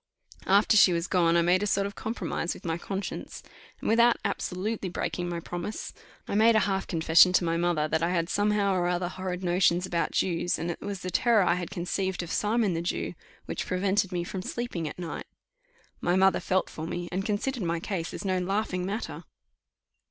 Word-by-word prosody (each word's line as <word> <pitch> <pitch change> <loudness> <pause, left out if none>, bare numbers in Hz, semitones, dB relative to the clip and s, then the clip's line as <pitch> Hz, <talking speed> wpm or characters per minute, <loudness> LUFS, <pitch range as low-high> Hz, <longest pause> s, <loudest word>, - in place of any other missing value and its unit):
After 200 +3 +4
she 185 -3 +7
was 170 0 0
gone 170 -3 +3
I 170 - +4
made 180 +2 +3
a 205 - 0
sort 195 0 +1
of 200 - -4
compromise 195 -6 -3
with - - -13
my 165 -1 0
conscience, 195 +2 -5 0.4
and - - -5
without 235 +2 +5
absolutely 200 +1 -2
breaking 175 0 -3
my 170 -1 -3
promise, 175 +5 -5 0.3
I - - -4
made 220 +2 +5
a 220 - +5
half 195 -1 -1
confession 165 +2 +5
to 185 - +4
my 165 -1 0
mother 170 -3 +1
that 160 +1 0
I 170 - +1
had 170 -2 0
somehow 205 0 +1
or 180 -1 +1
other 175 0 0
horrid 185 0 -5
notions 180 0 +2
about 170 -2 -1
Jews; 175 -1 0
and 170 +1 -2
that - - -7
it - - -7
was 200 -2 -4
the 185 - -4
terror 225 +2 +4
I 175 - +3
had 175 -1 -3
conceived 185 0 -2
of 175 - -7
Simon 215 -2 +1
the 165 - -1
Jew 175 - -2 0.3
which - - -4
prevented 190 +1 +1
me 175 -1 -1
from 185 +2 -5
sleeping 190 -6 -4
all - - -5
night. 175 -2 -6 0.7
My 175 - +1
mother 190 0 +4
felt 190 0 0
for 160 +1 -6
me, 175 0 -4
and 190 +2 -1
considered 225 +5 -2
my 170 -2 -1
case 175 -2 -3
as - - -7
no 185 -1 +1
laughing 185 0 -1
matter. 210 +4 -4
185 Hz, 210 wpm, -28 LUFS, 175-200 Hz, 0.7 s, she